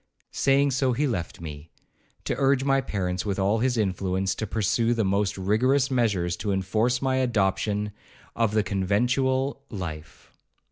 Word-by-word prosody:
Saying 140 +1 +2
so 130 -1 +1
he 140 +5 0
left 90 -11 -3
me, 75 -1 -8 0.5
to - - -1
urge 135 -1 +3
my 135 0 +2
parents, 90 -6 -2
with 100 -2 -2
all 100 +3 +1
his 125 +1 +1
influence, 95 -2 0
to 110 +3 -4
pursue 115 +3 +1
the 110 -3 +1
most 100 +1 0
rigorous 130 +8 +2
measures 100 -9 +1
to 100 +2 -2
enforce 110 +7 0
my 130 -1 +1
adoption 105 -3 0 0.4
of 115 -2 +1
the 110 - +3
conventual 125 +8 0
life. 85 -5 -8
110 Hz, 150 wpm, -26 LUFS, 95-130 Hz, 0.5 s, urge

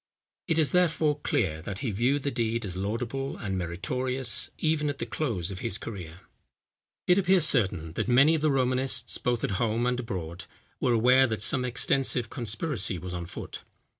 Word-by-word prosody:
It 165 - +1
is, 155 -3 +3
therefore, 165 -4 +2
clear, 95 - -1
that 95 +3 -5
he 115 - 0
viewed 125 +7 0
the 140 - -1
deed 115 -2 -1
as 90 -2 -5
laudable 115 +7 -3
and 95 -3 -4
meritorious, 125 +8 0
even 155 -2 0
at 145 - -4
the - - -4
close 105 - -3
of 95 - -7
his 95 - -2
career. 90 -7 -8 0.8
It 180 +2 +4
appears 185 -3 +4
certain 95 - +1
that - - -2
many 135 +6 +5
of 160 - 0
the 155 - +2
Romanists, 130 -1 +1
both 120 -2 -1
at - - -1
home 115 +1 0
and 125 0 0
abroad, 90 -8 -6 0.3
were 125 - +1
aware 125 +3 +5
that 110 -2 -1
some 130 +3 +2
extensive 125 0 +1
conspiracy 115 - 0
was 90 +1 -7
on 85 -1 -5
foot. 90 - -8
120 Hz, 180 wpm, -27 LUFS, 100-140 Hz, 0.8 s, many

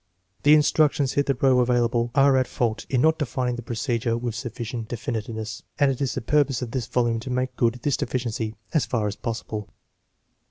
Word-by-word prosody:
The 150 +1 +7
instructions 150 -2 +3
hitherto 135 -2 +3
available 120 -1 +2
are 140 -1 +5
at 130 -1 +2
fault 115 -2 -2
in 130 -2 +2
not 160 +2 +3
defining 125 -3 -1
the 120 - -5
procedure 115 0 -1
with 120 -1 -3
sufficient 120 -1 -5
definiteness, 110 -1 -4 0.2
and 140 -1 +4
it 130 - -5
is 135 - -1
the 130 - -2
purpose 135 -1 +1
of 120 - -5
this 125 -4 -2
volume 120 -1 +1
to 120 - -7
make 130 +1 -1
good 115 -1 +2
this 145 -3 +1
deficiency 115 -3 -2 0.2
as 140 -9 +2
far 115 -2 0
as 105 -1 -2
possible. 110 -2 -5
120 Hz, 185 wpm, -24 LUFS, 115-135 Hz, 0.2 s, The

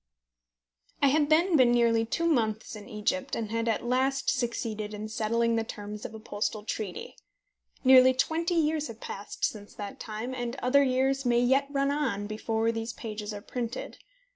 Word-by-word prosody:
I 280 - +7
had 295 +1 +2
then 335 +3 +4
been 255 -4 +6
nearly 230 -1 +3
two 335 +8 -1
months 220 -10 0
in 210 +2 -10
Egypt, 260 +6 -1
and 220 -2 -4
had 230 0 -1
at 225 +1 0
last 265 +2 +1
succeeded 225 -4 -2
in 210 +1 -5
settling 230 +1 +1
the 225 - +1
terms 210 -1 -7
of - - -6
a - - -8
postal 215 0 -3
treaty. 210 -3 -5 0.7
Nearly 260 0 +7
twenty 330 +6 0
years 310 -1 +1
have 225 -1 -10
passed 200 -2 -4
since 205 -1 -5
that 205 -1 -7
time, 220 +3 -5
and 245 -1 -3
other 270 +1 +3
years 265 +1 +1
may 240 -1 +3
yet 265 +3 +3
run 275 0 +1
on 265 -9 -1
before 220 +2 -1
these 225 0 -4
pages 215 -2 -6
are 205 -1 -6
printed. 240 0 -5
235 Hz, 175 wpm, -28 LUFS, 215-270 Hz, 0.7 s, I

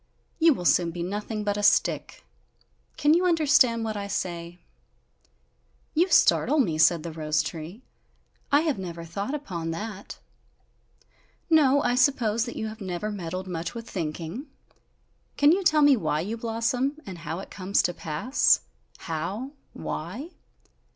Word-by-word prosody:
You 325 -3 +5
will 180 - -6
soon 175 0 +4
be 170 +1 -5
nothing 210 +3 -4
but 205 0 -1
a - - -1
stick! 205 - +1 0.7
Can 295 +1 +4
you 360 +2 +3
understand 295 -8 +4
what 220 -1 -3
I 200 -1 -4
say?" 175 -3 -4 1.3
"You 345 +4 +2
startle 305 - +4
me," 170 - +1
said 165 0 +4
the 170 - -5
rose 155 -1 0
tree, 170 +8 -7 0.7
"I 285 +1 +5
have 310 -9 -1
never 170 -2 -6
thought 200 - -4
upon 175 - -5
that!" 205 +4 -6 1.3
"No, 285 -3 +5
I 245 - +2
suppose 245 -3 +2
that 240 - -7
you - - -3
have 220 0 -7
never 190 +2 -3
meddled 185 -1 -5
much 170 +2 -4
with 230 -1 -7
thinking! 170 - -5 0.9
Can 290 +1 +6
you 380 +3 +2
tell 305 -4 +4
me 290 -1 +7
why 155 -8 -1
you 210 +6 -3
blossom? 235 +5 -1
And 185 -3 -8
how 160 0 -5
it 195 - -9
comes 195 +1 0
to 175 - 0
pass? 170 - +2 0.4
How? 190 - -4 0.2
Why?" 225 - -6
205 Hz, 150 wpm, -26 LUFS, 170-265 Hz, 1.3 s, me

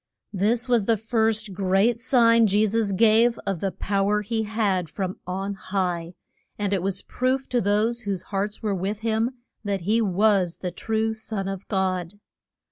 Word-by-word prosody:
This 225 +6 +1
was 240 -5 +2
the 230 -1 +3
first 220 -1 0
great 195 +5 +2
sign 230 -2 +4
Je 205 +2 +3
sus 215 -1 0
gave 225 +3 +4
of 195 -4 -2
the 195 +2 -1
pow 195 +1 -1
er 210 0 +2
he 220 +2 -1
had 205 -6 -1
from 190 +2 -4
on 195 +2 -3
high. 180 -3 -3 0.4
And 205 -1 -1
it 190 - +1
was 190 +1 -1
proof 260 +1 -1
to 245 -1 +1
those 210 +4 +1
whose 195 -5 -3
hearts 205 +2 -2
were 210 -2 0
with 195 +3 -3
him 225 +3 0 0.3
that 200 -3 -2
he 215 +6 +1
was 195 -3 +2
the 180 - -4
true 220 +4 -1
Son 220 -3 -4
of 195 -1 -6
God. 185 -2 -1
205 Hz, 175 wpm, -24 LUFS, 190-225 Hz, 0.4 s, sign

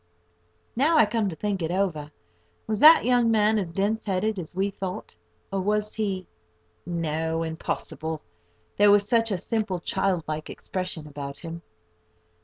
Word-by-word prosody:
Now 305 +7 +3
I 265 - +7
come 210 -1 0
to 165 - -6
think 200 +1 -2
it 160 - -1
over, 175 -5 -1 0.6
was 215 -1 -1
that 310 0 +8
young 245 -1 +3
man 215 -1 +3
as 180 -4 -3
dense 205 +5 0
headed 205 +1 0
as 175 0 -8
we 195 +2 0
thought? 185 - -6 0.4
or 195 - 0
was 210 +2 0
he—no, 160 - -4
impossible! 160 -1 -4 0.5
there 205 0 +6
was 205 0 +5
such 230 0 +3
a 195 - 0
simple, 210 -1 -2
child 190 -1 0
like 155 0 -4
expression 185 -4 -4
about 140 -1 -7
him! 165 0 -7
190 Hz, 150 wpm, -26 LUFS, 160-210 Hz, 0.6 s, that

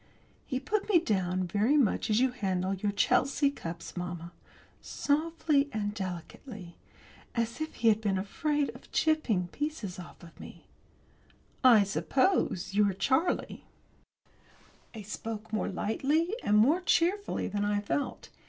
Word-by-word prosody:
He 260 -3 -1
put 405 +11 -2
me 390 - +6
down 185 - 0
very 210 - +2
much 250 -6 +2
as 215 +1 +3
you 260 0 +3
handle 190 -5 -1
your 200 +2 -1
Chelsea 275 +7 +2
cups, 170 -10 -7
mamma 175 -1 -5 0.5
softly 300 -1 0
and 205 -3 -2
delicately, 185 - -7 0.6
as 230 +4 -2
if 315 - -4
he 230 - +3
had 220 0 +2
been 200 -3 0
afraid 290 +9 -1
of - - -16
chipping 240 - +1
pieces 280 - -4
off 175 - -11 0.2
me. - - -12 1.0
"I 235 -5 +7
suppose 200 - 0
you're 200 -1 +3
Charlie?" 265 - 0 1.3
I 215 - -7
spoke 215 +1 -6
more 215 - 0
lightly 290 - 0
and 210 - +3
more 290 +12 +4
cheerfully 370 +3 +1
than 205 +1 -2
I 205 0 +1
felt. 210 +7 -3
220 Hz, 135 wpm, -30 LUFS, 195-290 Hz, 1.3 s, I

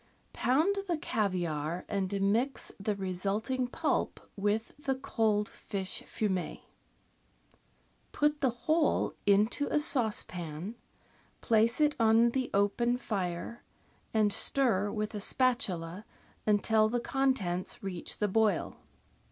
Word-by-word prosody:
— - - -38
Pound 315 +11 +2
the 345 -3 0
caviare 175 - -2
and 200 -1 -2
mix 235 +7 0
the 205 +1 -1
result 195 +4 -2
ing 255 -1 0
pulp 315 +5 -1 0.2
with 210 +2 -1
the 270 -2 -1
cold 215 -5 0
fish 190 -2 -5
fumet. 190 -5 -2 1.5
Put 295 0 +1
the 265 - +3 0.2
whole 315 -1 +2
into 210 +8 +3
a - - +1
sauce 250 -8 +4
pan, 175 +3 -6 0.7
place 230 +2 +2
it 300 -1 +3
on 225 +1 +5
the 260 0 -1
open 235 +5 +1
fire, 195 -1 -4 0.5
and 215 -2 +2
stir 215 -7 +2
with 215 0 -3
a 210 - -3
spatula 205 -8 0 0.4
until 215 +1 +3
the 245 +2 0
contents 235 -11 -1
reach 185 -3 -4
the 210 - +1
boil. 210 -2 +1
215 Hz, 120 wpm, -30 LUFS, 195-250 Hz, 1.5 s, on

